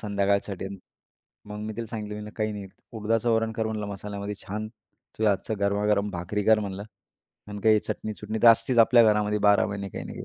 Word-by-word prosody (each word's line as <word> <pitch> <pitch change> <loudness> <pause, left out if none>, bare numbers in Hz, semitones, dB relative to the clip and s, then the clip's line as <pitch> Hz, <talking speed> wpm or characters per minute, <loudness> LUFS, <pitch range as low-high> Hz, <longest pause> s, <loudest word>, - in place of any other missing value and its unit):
संध्याकाळसाठी?" 100 -2 -1 0.8
मग 105 0 -6
मी 110 +1 -4
तिला 115 0 -4
सांगितलं, 105 -1 -6
"काही 110 -1 -1
नाही 100 -1 -6 0.3
उडदाचं 115 +1 0
वरण 115 0 +1
कर 110 -1 -2
म्हणलं 110 -1 -3
मसाल्यामध्ये 100 +1 -5
छान, 105 +2 -4
तुझ्या 110 -1 -4
हातचं 100 +3 -2
गरमागरम 100 0 +1
भाकरी 90 +3 -3
कर 110 0 +5
म्हणलं 100 -1 -5 0.7
आणि 105 0 -6
काही 110 -1 +6
चटणी-चुटणी 110 0 -5
तर 120 - +9
असतीच 120 +2 +4
आपल्या 115 +1 +7
घरामध्ये 105 0 0
12 105 - +4
महिने 100 -1 -5
काही - - -7
ना - - -8
काही." - - -8
105 Hz, 180 wpm, -26 LUFS, 100-110 Hz, 0.8 s, तर